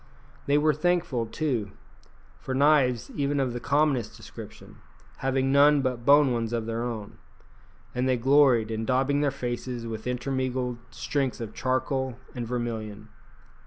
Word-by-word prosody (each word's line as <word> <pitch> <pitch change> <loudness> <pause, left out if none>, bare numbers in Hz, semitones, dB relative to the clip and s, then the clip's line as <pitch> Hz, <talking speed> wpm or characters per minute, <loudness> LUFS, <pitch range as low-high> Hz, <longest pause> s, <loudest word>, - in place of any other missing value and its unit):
They 140 +1 +4
were 155 +1 +3
thankful, 155 -8 0
too, 115 -6 -2 0.7
for 130 - -4
knives 135 -4 +3
even 140 0 0
of 130 -3 0
the 120 - -4
commonest 140 -4 +1
description, - - -11 0.4
having 135 0 0
none 145 +1 +6
but 125 -2 -2
bone 145 -2 +6
ones 115 -1 -2
of 115 -2 -1
their 115 0 -3
own; 115 -4 -5 0.7
and 125 +1 0
they 130 - +2
gloried 130 -3 +4
in 110 0 -2
daubing 135 +4 +1
their 145 - +2
faces 120 -2 -4
with 110 0 -6
intermingled 125 -1 -2
streaks 135 -3 -2
of 110 -2 -6
charcoal 130 0 -1 0.2
and 120 -2 -5
vermilion. 110 -3 -4
130 Hz, 145 wpm, -27 LUFS, 115-140 Hz, 0.7 s, none